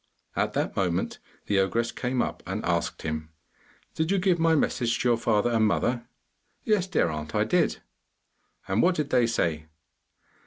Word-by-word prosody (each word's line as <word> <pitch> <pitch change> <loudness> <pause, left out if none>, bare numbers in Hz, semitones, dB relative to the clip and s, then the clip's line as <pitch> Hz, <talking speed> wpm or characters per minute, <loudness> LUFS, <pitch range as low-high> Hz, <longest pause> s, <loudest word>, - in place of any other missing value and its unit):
At - - 0
that - - -1
moment 90 -3 -1 0.3
the 100 -1 +2
ogress 115 +5 +1
came 125 0 -1
up - - -5
and 95 +3 -3
asked 85 -1 -1
him, 80 0 -3 0.6
'Did 160 +1 -1
you 200 - +2
give 180 -2 +2
my 165 0 +4
message 120 -5 +1
to 125 - +2
your 120 - +5
father 115 0 +1
and 110 -2 +3
mother?' 120 +3 0 0.6
'Yes, 205 -4 +1
dear 175 - +1
aunt, 75 -1 -5
I - - +3
did.' - - +1 0.9
'And 95 +4 +2
what 180 0 +3
did 150 -3 -2
they 125 -2 +4
say? 80 -9 -1
115 Hz, 170 wpm, -27 LUFS, 90-145 Hz, 0.9 s, your